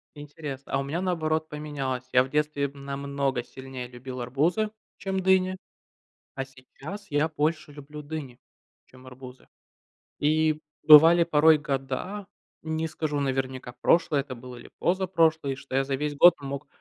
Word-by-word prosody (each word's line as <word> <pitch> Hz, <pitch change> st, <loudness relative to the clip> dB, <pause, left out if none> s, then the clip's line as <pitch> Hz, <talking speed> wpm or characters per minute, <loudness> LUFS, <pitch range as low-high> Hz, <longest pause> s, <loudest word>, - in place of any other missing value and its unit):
Интересно, 145 Hz, -2 st, -8 dB
а 135 Hz, -, +2 dB
у -, -, -1 dB
меня 160 Hz, +6 st, -3 dB
наоборот 160 Hz, -3 st, -1 dB
поменялось. 140 Hz, -4 st, -4 dB
Я 125 Hz, 0 st, +6 dB
в 130 Hz, -, -8 dB
детстве 150 Hz, -1 st, 0 dB
намного 140 Hz, -2 st, -3 dB
сильнее 130 Hz, -1 st, -8 dB
любил 125 Hz, +1 st, -8 dB
арбузы, 160 Hz, -, 0 dB, 0.3 s
чем 190 Hz, -1 st, -2 dB
дыни, 185 Hz, 0 st, +3 dB, 0.8 s
а 135 Hz, -, -3 dB
сейчас 135 Hz, +9 st, -11 dB
я 145 Hz, +2 st, +2 dB
больше 155 Hz, 0 st, -1 dB
люблю 150 Hz, +1 st, -10 dB
дыни, 145 Hz, -5 st, -7 dB, 0.5 s
чем 130 Hz, 0 st, -17 dB
арбузы. 130 Hz, 0 st, -12 dB, 0.7 s
И 155 Hz, +1 st, +2 dB, 0.3 s
бывали 165 Hz, +3 st, +9 dB
порой 160 Hz, -1 st, +5 dB
года, 145 Hz, +8 st, -4 dB, 0.4 s
не 160 Hz, 0 st, -2 dB
скажу 150 Hz, -2 st, -2 dB
наверняка, 130 Hz, -2 st, -2 dB
прошлые 150 Hz, -4 st, +3 dB
это 130 Hz, -2 st, -8 dB
были 125 Hz, 0 st, -10 dB
или -, -, -15 dB
позапрошлые, 165 Hz, -6 st, +1 dB
что 135 Hz, -1 st, -8 dB
я 135 Hz, 0 st, +2 dB
за 135 Hz, 0 st, -1 dB
весь 145 Hz, +1 st, -3 dB
год 175 Hz, +3 st, +8 dB
мог, 140 Hz, +1 st, -6 dB
145 Hz, 145 wpm, -26 LUFS, 135-160 Hz, 0.8 s, бывали